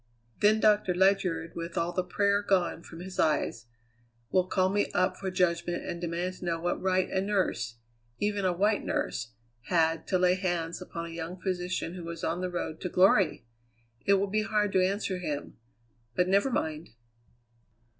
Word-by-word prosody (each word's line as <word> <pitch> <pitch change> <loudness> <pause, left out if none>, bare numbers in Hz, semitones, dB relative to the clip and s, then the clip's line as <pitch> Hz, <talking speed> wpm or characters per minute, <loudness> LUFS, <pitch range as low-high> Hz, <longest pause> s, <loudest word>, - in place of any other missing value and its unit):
Then 215 +1 +5
Doctor 210 -4 +3
Ledyard, 185 -3 +2
with 170 +1 -5
all 170 +1 +1
the 185 - 0
prayer 200 +3 +2
gone 185 -4 +1
from 165 0 -11
his 185 +1 -8
eyes, 120 -6 +1 0.6
will 185 -1 +3
call 185 0 +2
me 205 +1 +1
up 185 +1 +2
for 195 - -4
judgment 175 -1 0
and 170 - -5
demand 175 +2 -2
to - - -8
know 165 -1 -1
what 175 +1 -1
right 185 0 +2
a 190 - +1
nurse, 185 - -1 0.4
even 205 -1 -1
a 185 - +3
white 205 +4 +1
nurse, 115 0 -2 0.3
had 165 -2 +2
to 185 - +2
lay 180 0 +4
hands 175 -3 -2
upon 170 0 -6
a - - -7
young 165 +2 -6
physician 180 -2 -2
who 180 -2 -7
was 165 0 -7
on 170 +2 -1
the 185 - -1
road 175 -2 -4
to 180 - -2
glory! 185 - +4 0.6
It 200 - +4
will 195 +1 +2
be 210 +2 0
hard 210 -2 +1
to 185 -1 +3
answer 190 -1 -1
him; 150 -5 -4 0.6
but 180 - +2
never 200 +7 +3
mind!" 160 -9 -2
180 Hz, 180 wpm, -29 LUFS, 170-195 Hz, 0.6 s, Then